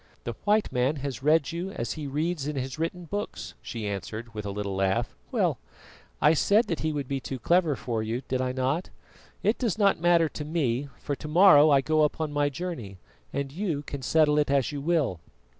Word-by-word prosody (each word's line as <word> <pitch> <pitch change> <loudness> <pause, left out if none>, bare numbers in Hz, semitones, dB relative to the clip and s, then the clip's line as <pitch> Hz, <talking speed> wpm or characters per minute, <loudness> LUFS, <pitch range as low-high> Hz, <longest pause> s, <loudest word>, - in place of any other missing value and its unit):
"The - - -4
white 210 +1 +2
man 130 +3 +1
has 140 -3 -5
read 155 +1 +3
you 175 +3 -4
as 115 - -3
he 150 -2 -5
reads 150 +1 -2
in 150 - -3
his 135 +2 -4
written 170 +2 -3
books," 205 +5 -5
she 110 -3 -5
answered, 110 +4 -5
with 105 -1 -5
a - - -3
little 100 -1 -3
laugh. 95 0 0 0.2
"Well, - - +1 0.6
I 150 +2 +5
said 205 +8 +3
that 165 - -1
he 155 - 0
would 145 -3 -3
be 135 0 -2
too 135 0 -5
clever 170 +3 +2
for 115 -3 -3
you, 115 +4 -3
did 130 0 -1
I 130 0 0
not? 130 +7 -1 0.5
It 215 +4 +2
does 230 -7 0
not 200 -5 +3
matter 170 -1 +4
to 150 - -6
me, 145 -4 -1
for 145 - -3
to - - -7
morrow 155 -2 +7
I 140 -2 +5
go 155 +2 +2
upon 150 0 0
my 145 0 +2
journey, 130 - -6 0.3
and 140 0 -3
you 165 -3 -2
can 140 -1 -6
settle 150 +2 +3
it 145 - +1
as 140 -1 +2
you 145 -1 -4
will." 145 - +1
145 Hz, 210 wpm, -27 LUFS, 130-165 Hz, 0.6 s, morrow